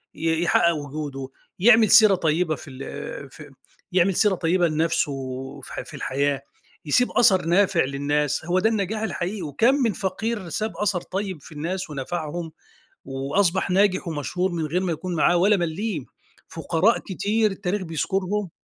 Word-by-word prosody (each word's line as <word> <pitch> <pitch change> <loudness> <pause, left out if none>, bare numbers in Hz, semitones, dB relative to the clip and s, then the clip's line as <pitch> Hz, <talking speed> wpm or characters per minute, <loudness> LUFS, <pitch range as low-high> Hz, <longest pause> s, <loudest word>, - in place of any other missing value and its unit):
ي 165 0 0
يحقِّق 170 +1 +3
وجوده، 145 -2 -6 0.3
يعمَل 220 +1 +6
سيرة 215 -4 +8
طيِّبة 160 -1 0
في 145 - -12
ال 130 0 -7
في - - -12 0.4
يعمَل 180 0 +3
سيرة 210 -3 +3
طيِّبة 175 +1 +2
لنَفْسه 160 -1 0 0.5
في - - -7
في - - -13
الحياة، 140 +1 -1 0.4
يسيب 245 +12 +2
أثَر 210 -8 +4
نافِع 175 0 +3
للناس، 145 +2 -1
هو 180 +2 +1
ده 220 - +3
النجاح 215 0 -2
الحقيقي. 200 -2 -3
وكام 175 - +2
من 240 -7 +1
فقير 210 -1 -3
ساب 215 +6 -3
أثَر 200 -4 0
طيِّب 190 -4 -4
في - - -14
الناس 170 +5 -4
ونفَعهم، 160 +3 -4 0.5
وأصبَح 170 +9 0
ناجِح 195 -1 +2
ومشهور 170 +4 -2
من 165 -2 -2
غير 175 +5 -1
ما 185 - -1
يكون 175 +2 -4
معاه 175 +3 +3
ولا 200 +4 +4
مليم، 170 - -3 0.4
فقراء 185 +7 +1
كتير 210 +2 0
التاريخ 195 +1 -2
بيذكُرهم. 185 +4 -2
175 Hz, 150 wpm, -24 LUFS, 155-200 Hz, 0.5 s, سيرة